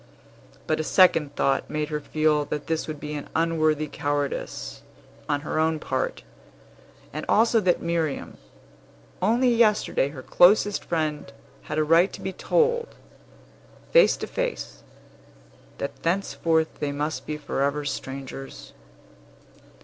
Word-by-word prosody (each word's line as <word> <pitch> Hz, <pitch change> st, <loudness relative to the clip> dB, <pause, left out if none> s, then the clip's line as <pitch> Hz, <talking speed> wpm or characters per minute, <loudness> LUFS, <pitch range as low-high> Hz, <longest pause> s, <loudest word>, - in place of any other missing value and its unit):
But 155 Hz, -, 0 dB
a -, -, 0 dB
second 165 Hz, -4 st, +4 dB
thought 135 Hz, 0 st, +1 dB
made 150 Hz, 0 st, -2 dB
her 150 Hz, -1 st, -2 dB
feel 155 Hz, 0 st, +1 dB
that 150 Hz, 0 st, -4 dB
this 160 Hz, -1 st, -2 dB
would 155 Hz, -2 st, -5 dB
be 150 Hz, +1 st, -6 dB
an 145 Hz, -1 st, -6 dB
unworthy 155 Hz, -2 st, +1 dB
cowardice, 145 Hz, -1 st, -3 dB, 0.5 s
on 145 Hz, -1 st, +1 dB
her 155 Hz, -, -2 dB
own 160 Hz, 0 st, +2 dB
part, 130 Hz, -3 st, -3 dB, 0.9 s
and 155 Hz, +1 st, -4 dB
also 225 Hz, +1 st, +4 dB
that 180 Hz, -4 st, +1 dB
Miriam 165 Hz, -4 st, -2 dB, 0.8 s
only 235 Hz, +7 st, +3 dB
yesterday 215 Hz, -, +2 dB
her 135 Hz, -3 st, -9 dB
closest 205 Hz, +3 st, +4 dB
friend 155 Hz, -4 st, -2 dB, 0.4 s
had 150 Hz, -, -2 dB
a 155 Hz, -, +3 dB
right 165 Hz, +5 st, +4 dB
to -, -, -8 dB
be 190 Hz, -, -4 dB
told, 475 Hz, -, +1 dB, 1.0 s
face -, -, +6 dB
to -, -, -4 dB
face, -, -, -4 dB, 1.0 s
that -, -, -5 dB
thenceforth 165 Hz, -3 st, 0 dB
they 145 Hz, -1 st, -1 dB
must 150 Hz, +2 st, -3 dB
be 150 Hz, -, -3 dB
forever 145 Hz, 0 st, -1 dB
strangers. 135 Hz, -1 st, -6 dB
155 Hz, 130 wpm, -25 LUFS, 145-180 Hz, 1.0 s, face